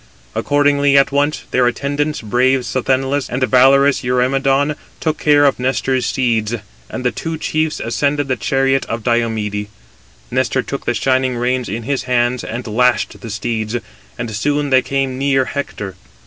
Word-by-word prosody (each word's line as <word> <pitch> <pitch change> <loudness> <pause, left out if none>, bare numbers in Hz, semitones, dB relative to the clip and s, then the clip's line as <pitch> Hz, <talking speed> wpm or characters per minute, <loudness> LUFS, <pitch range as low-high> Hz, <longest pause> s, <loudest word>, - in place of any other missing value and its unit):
Accordingly, 145 -1 +3
at 140 - +4
once 145 +2 0
their 125 -1 +3
attendants, 145 +4 -1
brave 125 +4 +2
Sthenelus 130 +4 0
and 130 +1 -1
valorous 135 +2 +4
Eurymedon, 135 +3 +1 0.2
took 155 -1 -1
care 145 -1 +4
of 140 - +2
Nestor's 130 -1 0
steeds: 115 -3 0 0.3
and 130 - -6
the 125 - +3
two 165 -1 -4
chiefs 155 0 -1
ascended 145 +4 0
the 130 - 0
chariot 135 +4 +1
of 115 -1 -4
Diomede. 110 -3 -1 0.6
Nestor 130 +1 0
took 140 - -6
the 120 - +1
shining 130 +1 +1
reins 125 +1 -1
in 115 +4 -4
his 135 +1 -2
hands, 120 0 +1
and 120 +1 -5
lashed 120 +1 +1
the 115 - -7
steeds, 110 +1 -2 0.4
and 115 - -4
soon 145 +7 -1
they 130 0 +6
came 130 0 -2
near 135 -1 +2
Hector. 105 -9 -5
130 Hz, 155 wpm, -17 LUFS, 120-140 Hz, 0.6 s, they